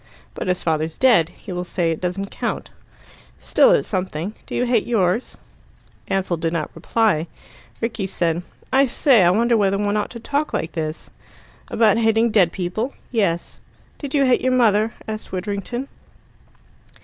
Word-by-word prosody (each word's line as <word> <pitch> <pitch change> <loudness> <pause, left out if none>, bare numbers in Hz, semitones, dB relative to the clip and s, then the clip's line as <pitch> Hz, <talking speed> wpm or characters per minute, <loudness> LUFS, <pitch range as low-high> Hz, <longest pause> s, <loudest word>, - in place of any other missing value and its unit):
"But - - -5
his 180 -1 0
father's 160 -1 -1
dead. 225 -11 +4
He - - -11
will 180 0 -3
say 175 -2 -1
it 160 - -4
doesn't 190 +2 -3
count." - - -4 0.7
"Still, - - +4
it's - - +3
something. 185 -1 -3
Do - - -5
you 245 - +1
hate 240 -3 +1
yours?" 215 -1 0 0.7
Ansell 190 -3 0
did 165 +1 -2
not 160 -3 -2
reply. 205 -8 +1 0.5
Rickie 225 -4 -2
said: 170 -2 -1 0.3
"I 270 +1 +5
say, 250 -2 +4
I 175 - +5
wonder 230 +5 +3
whether 200 -2 +2
one 205 +1 0
ought 210 - -1
to 235 - -9
talk 290 +6 -1
like 165 - -2
this?" 155 -1 -4 0.6
"About 220 -1 +3
hating 225 0 +3
dead 185 -6 +4
people?" 190 +10 -3 0.2
"Yes 195 -8 -1 0.2
" - - -32
"Did 285 -1 -4
you 280 -1 +4
hate 255 -1 +3
your 255 0 +1
mother?" 220 -3 +3
asked 215 0 -6
Widdrington. 205 +7 -4
205 Hz, 165 wpm, -21 LUFS, 175-235 Hz, 0.7 s, I